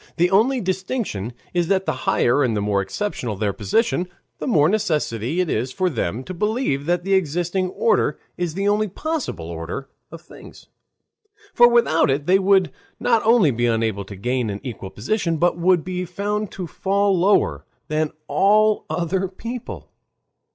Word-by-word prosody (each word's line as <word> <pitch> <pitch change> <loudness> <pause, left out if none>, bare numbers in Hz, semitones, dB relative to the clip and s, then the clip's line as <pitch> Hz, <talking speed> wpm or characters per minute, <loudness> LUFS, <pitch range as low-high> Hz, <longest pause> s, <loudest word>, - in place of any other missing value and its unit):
The 175 +2 +3
only 240 +7 +3
distinction 185 - -3 0.2
is 175 -2 +1
that 190 0 +1
the - - +1 0.2
higher 120 +4 +3
and 115 -4 0
the - - +1
more 100 -1 +1
exceptional 115 - -3
their 100 0 -1
position, 175 - 0 0.3
the - - -4
more 155 - +4
necessary 155 - -1
it 180 - +1
is 125 -2 -1
for 185 +4 0
them 115 - -2
to 185 - -7
believe 210 - -1
that 175 0 +1
the 195 +1 0
existing 175 +1 0
order 465 - +1 0.2
is 175 -2 -3
the 200 +1 -1
only 210 +1 +2
possible 295 - -4
order 85 +11 -6 0.2
of 165 - -10
things. - - -14 0.9
For 240 - +7
without 235 -11 +3
it 140 +2 0
they 190 +3 +4
would 190 -1 +3 0.3
not 230 -2 +2
only 220 - +5
be 120 0 0
unable 110 -3 0
to 100 - -9
gain 120 +3 -1
an 100 0 -4
equal 115 -7 -6
position, 165 - -1
but 175 +2 +1
would 175 -1 +3
be 180 0 -3
found 205 +3 -3
to 185 - -5
fall 195 +4 +1
lower 190 +4 +2 0.2
than 155 -1 0 0.2
all 215 +2 +3
other 185 +2 -1
people. 230 +6 -8
175 Hz, 170 wpm, -22 LUFS, 130-200 Hz, 0.9 s, For